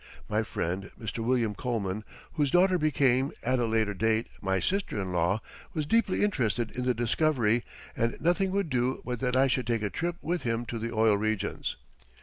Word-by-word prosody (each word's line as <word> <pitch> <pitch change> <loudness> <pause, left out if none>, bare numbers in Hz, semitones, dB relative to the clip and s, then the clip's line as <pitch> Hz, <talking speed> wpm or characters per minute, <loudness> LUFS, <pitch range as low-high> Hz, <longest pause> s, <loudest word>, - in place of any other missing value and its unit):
My 105 +1 +1
friend 95 -2 -3
Mr. 110 0 -5
William 120 -3 +1
Coleman, 105 -3 -2 0.3
whose 145 -3 +1
daughter 180 +3 +4
became, 135 -3 +2
at 130 +1 +1
a 120 - +1
later 110 -2 +1
date, 110 +3 +1 0.2
my 95 -1 +1
sister 195 - -1
in 95 -2 -3
law, 90 +4 +1 0.3
was 155 -2 0
deeply 225 +2 +2
interested 120 - 0
in 125 0 -2
the 125 -1 +2
discovery, 120 -1 +2 0.3
and 115 0 -1
nothing 175 +5 +2
would 195 -4 -1
do 125 +1 0
but 125 -2 -3
that 125 -1 0
I 130 +1 +5
should 130 -2 0
take 115 -2 0
a 105 - -1
trip 175 0 -2
with 175 +2 -1
him 115 0 -1
to 115 -1 -4
the 115 +1 -3
oil 110 -2 +3
regions. 110 -1 -1
120 Hz, 190 wpm, -29 LUFS, 110-145 Hz, 0.3 s, I